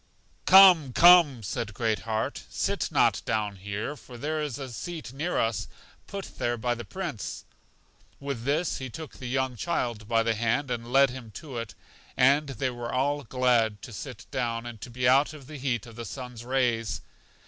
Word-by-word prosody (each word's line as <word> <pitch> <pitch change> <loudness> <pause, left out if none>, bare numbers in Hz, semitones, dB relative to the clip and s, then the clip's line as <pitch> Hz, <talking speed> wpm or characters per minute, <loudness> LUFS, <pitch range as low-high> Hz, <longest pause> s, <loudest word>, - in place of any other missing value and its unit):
Come, 185 -8 +8
Come! 170 -8 +7
said 105 +1 -4
Great 110 -1 0
heart, 110 0 -1
sit - - -1
not - - +3
down 105 -3 -1
here; 100 +8 -4
for 125 -2 -12
there 155 +5 -2
is 145 -5 -3
a 135 -3 -7
seat 160 0 -6
near 155 +6 -2
us 115 -3 0 0.4
put 200 -1 -8
there 120 0 0
by 120 +2 0
the 120 0 -6
Prince. 155 - -5 0.7
With 140 -4 -4
this 145 +6 0
he 130 -1 -5
took 155 +6 -9
the 125 - -6
young 130 -1 0
child 120 -6 -2
by 115 0 +2
the 115 0 +1
hand, 120 +5 0
and 120 0 -4
led 135 0 +5
him 125 -3 -9
to 140 -7 -7
it; 110 -4 -7 0.4
and 140 +4 +4
they 130 0 -2
were 120 -1 -5
all 145 +3 0
glad 120 -4 +2
to 120 - -9
sit 120 +1 -8
down, 120 -3 -2
and 120 -3 -8
to - - -7
be 125 +1 -1
out 135 +4 +4
of 145 -3 -11
the 150 +2 -9
heat 125 -5 -2
of 115 -2 -12
the 115 - -5
sun's 125 -3 -7
rays. 120 -3 0
125 Hz, 190 wpm, -27 LUFS, 115-140 Hz, 0.7 s, Come